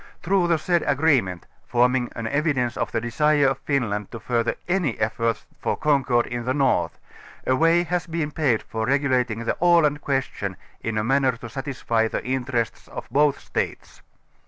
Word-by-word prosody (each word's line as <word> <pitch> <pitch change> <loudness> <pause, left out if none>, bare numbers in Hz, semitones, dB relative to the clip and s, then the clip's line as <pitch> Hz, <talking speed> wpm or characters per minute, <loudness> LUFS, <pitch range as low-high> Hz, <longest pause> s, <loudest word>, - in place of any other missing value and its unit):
Through 185 0 +2
the 170 -1 +3
said 175 +2 +1
12 - - +1
ag 140 - 0
reenient, 95 - +2 0.3
t'orming 125 +1 +2
an 115 - -4
evidence 135 -2 0
of - - -2
tlie 115 - -2
desire 145 +4 +2
of 135 0 -3
Finland 110 -9 -1
to 115 - -7
further 120 0 0
any 175 -9 0
efforts 115 +1 -1
for - - -1
concord 135 -5 +2
in 120 0 -4
the 130 +2 0
North, 135 -3 +1 0.5
a 130 - +3
way 165 +4 +4
has 175 0 -2
been 160 -2 -2
paved 135 -8 +1
for 110 0 -3
regulating 125 -4 +1
the - - 0
Aland 165 -4 +4
question 130 -8 -2 0.2
in 115 -1 -2
a 105 - +1
manner 135 +2 +2
to 120 0 -9
satisfy 125 -4 -1
the - - -4
interests 125 -2 -2
of - - -8
both 145 0 +3
States. - - -4
130 Hz, 180 wpm, -24 LUFS, 115-150 Hz, 0.5 s, way